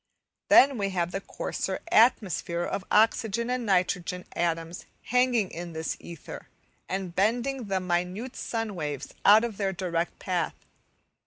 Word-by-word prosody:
Then 270 -3 +7
we 200 -1 0
have 175 -2 -1
the 195 - -3
coarser - - -4
atmosphere 195 - +3
of 190 - -3
oxygen 225 +2 +2
and 250 -2 -2
nitrogen 180 -1 0
atoms 165 0 -2 0.2
hanging 250 -5 +2
in 170 0 -7
this 160 0 -3
ether, 170 -3 -10 0.4
and 190 -2 -3
bending 240 +7 0
the 195 -2 0
minute 180 +7 -2
sun 225 -2 -3
waves 150 -6 -5
out 210 +3 +8
of 230 -4 -3
their 195 -2 -1
direct 175 -2 -2
path. 175 -4 -2
190 Hz, 140 wpm, -27 LUFS, 175-225 Hz, 0.4 s, out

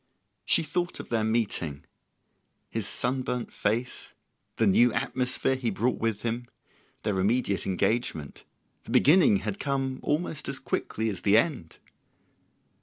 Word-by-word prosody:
She 165 - +5
thought 175 +3 -2
of - - -8
their 115 -2 +1
meeting, 105 -10 -1 0.9
his 110 -3 -2
sunburnt 125 -1 -2
face, 120 +4 -2 0.4
the 115 - +2
new 115 +5 +5
atmosphere 125 +3 0
he 125 -3 -1
brought 115 +5 0
with 110 -2 -1
him, 120 +1 -2 0.6
their 100 -3 0
immediate 100 0 +1
engagement: 95 - -1 0.4
the - - -12
beginning 145 - +5
had 105 -2 -3
come 135 -2 -1
almost 150 -1 -2
as 140 - -3
quickly 110 -4 -2
as 95 -3 -7
the 100 +2 +4
end! 120 - 0
120 Hz, 130 wpm, -27 LUFS, 105-130 Hz, 0.9 s, She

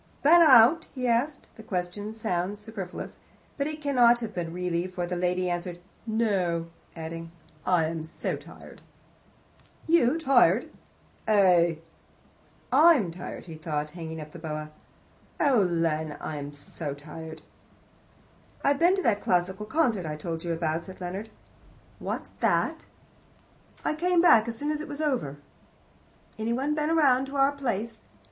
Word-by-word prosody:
"Been 335 +4 +7
out?" 285 +2 +7
he 255 -1 -3
asked. 255 +5 0
The - - -9
question 200 +1 -4
sounds 205 -3 -2
superfluous, 210 -4 -7 0.4
but 280 - -1
it 305 0 -6
cannot 245 -4 +5
have 220 -2 -5
been 170 -3 -3
really, 180 0 -2
for 180 -1 -4
the 180 +1 -3
lady 180 +1 0
answered, 175 0 -3 0.3
"No," 190 -7 0 0.3
adding, 165 0 -7 0.4
"Oh, 185 - +2
I 165 -3 +4
am 160 0 -3
so 160 - -3
tired." - - -13 1.0
"You 320 -4 +4
tired?" 250 - +3 0.6
"Eh?" 180 -5 +4 1.0
"I'm 280 - +5
tired," 175 +2 -8
said 155 -2 -4
he, - - -20
hanging 160 -2 -6
the - - -10
boa 160 -2 -4
up. 155 0 -7 0.7
"Oh, 275 -6 +4
Len, 165 -4 0
I 155 - -5
am 145 0 -6
so 145 0 -6
tired." 160 +2 -10 1.2
"I've 280 0 +2
been 350 +3 +5
to 380 - -2
that 205 -3 +2
classical 190 +3 0
concert 225 - +1
I 150 - -3
told 165 +1 -5
you 170 - -2
about," 165 0 -1
said 190 +1 -11
Leonard. 190 +4 -5 0.7
"What's - - -5
that?" - - +1 1.0
"I - - +1
came 350 +3 +1
back 235 -10 +6
as 230 -1 -4
soon 295 +3 -2
as 305 0 -2
it - - -7
was 290 0 -6
over." 255 - -1 1.0
"Any 225 +2 -1
one 275 +5 0
been 305 +2 0
round 270 -4 +4
to 275 - -8
our 275 0 +4
place?" 230 -5 -3
200 Hz, 155 wpm, -27 LUFS, 170-265 Hz, 1.2 s, Been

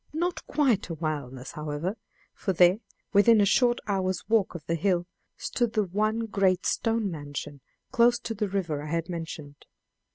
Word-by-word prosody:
Not 345 +3 -2
quite 265 - +1
a 165 - -3
wilderness, 145 -5 -4
however, 150 +6 -3 0.4
for 190 - -2
there, 180 +3 +5 0.3
within 215 +2 +6
a 205 - +5
short 240 +4 +3
hour's 190 -3 -1
walk 215 -5 +2
of 160 - -8
the 170 - -1
hill, 175 +1 +1 0.3
stood 240 -3 -1
the 215 - +2
one 215 +4 0
great 195 -4 +1
stone 225 -3 0
mansion, 145 -2 -6 0.3
close 240 -1 +4
to 225 - -4
the 210 -1 -2
river 175 -7 -2
I 150 - -7
had 165 +1 -2
mentioned. 160 -4 -7
190 Hz, 165 wpm, -27 LUFS, 160-220 Hz, 0.4 s, within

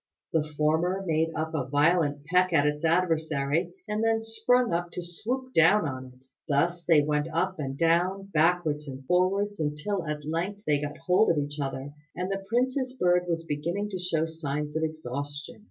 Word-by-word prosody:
The 160 - +3 0.2
former 165 +5 +1
made 160 -1 +1
a 155 -2 -2
violent 145 0 +2
peck 180 +2 +2
at 145 -3 +4
its 150 +1 -1
adversary, 160 -2 +1 0.2
and 215 +1 -1
then 225 0 +2
sprung 225 0 +2
up 175 +1 -1
to - - -4
swoop 250 +10 -4
down 165 +3 +5
on 130 -1 -5
it. 130 - -27 0.2
Thus 170 +4 +1
they 160 -4 +5
went 150 +1 0
on 160 - -9
up 185 -1 -1
and 135 -2 -4
down, 180 +4 +1
backwards 155 -2 +2
and 135 -1 -8
forwards, 195 +5 +1
until 155 +5 -2
at 150 -1 -4
length 180 +6 -3
they 145 -1 +2
got 145 0 -4
hold 185 +4 +4
of 165 - +2
each 145 +1 -3
other, 135 0 -4 0.2
and 180 +2 -3
the 195 0 -3
prince's 255 +2 0
bird 180 -7 +2
was 165 -1 -2
beginning 170 +8 -2
to 185 - -3
show 165 -3 0
signs 150 -2 -4
of 160 - 0
exhaustion. 145 - -5
165 Hz, 185 wpm, -27 LUFS, 150-185 Hz, 0.2 s, down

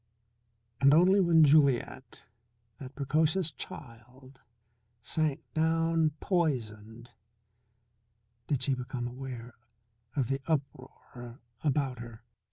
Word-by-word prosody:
And 140 +1 +5
only 185 +4 +5
when 170 -4 +5
Juliet, 140 -4 +2 0.5
that 135 -1 -10
precocious 155 +4 0
child, 130 0 -12 0.6
sank 150 +4 -2
down 165 -1 +1
poisoned 120 - -2 1.4
did 135 -3 0
she 135 - +1
become 125 -1 -4
aware 125 -1 -8 0.6
of 135 -5 0
the 135 +1 -2
uproar 130 -4 -5 0.2
about 140 -4 0
her. 115 -1 -10
135 Hz, 90 wpm, -29 LUFS, 120-155 Hz, 1.4 s, And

